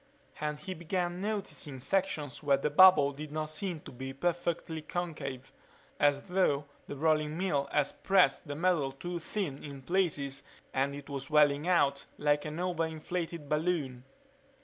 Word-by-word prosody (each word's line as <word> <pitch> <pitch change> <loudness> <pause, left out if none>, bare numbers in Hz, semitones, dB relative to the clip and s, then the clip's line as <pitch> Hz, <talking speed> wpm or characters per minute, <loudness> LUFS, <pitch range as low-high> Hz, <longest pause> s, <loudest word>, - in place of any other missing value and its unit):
And 150 0 -2
he 185 +5 -5
began 175 +1 -2
noticing 200 -9 -3
sections 150 -2 -1
where 140 -2 +3
the 145 +2 -1
bubble 150 -4 +8
did 150 +1 -8
not 155 0 -3
seem 170 0 -3
to - - -10
be 130 +1 -6
perfectly 170 +1 -1
concave, 150 -6 -5 0.5
as 145 -1 +3
though 180 -6 +1 0.2
the - - -5
rolling 155 +1 +1
mill 145 -7 0
had 145 -2 +2
pressed 190 -3 +4
the 145 - -4
metal 160 -5 +1
too 175 +5 -5
thin 165 -5 -4
in 140 -2 -8
places 145 -5 0 0.3
and 135 +1 0
it 145 -1 -9
was 140 -2 -4
swelling 150 +1 +4
out 140 -6 +2
like 145 0 +2
an 155 +2 -4
over 175 -2 0
inflated 165 0 -4
balloon. 150 -5 -1
155 Hz, 155 wpm, -31 LUFS, 140-175 Hz, 0.5 s, bubble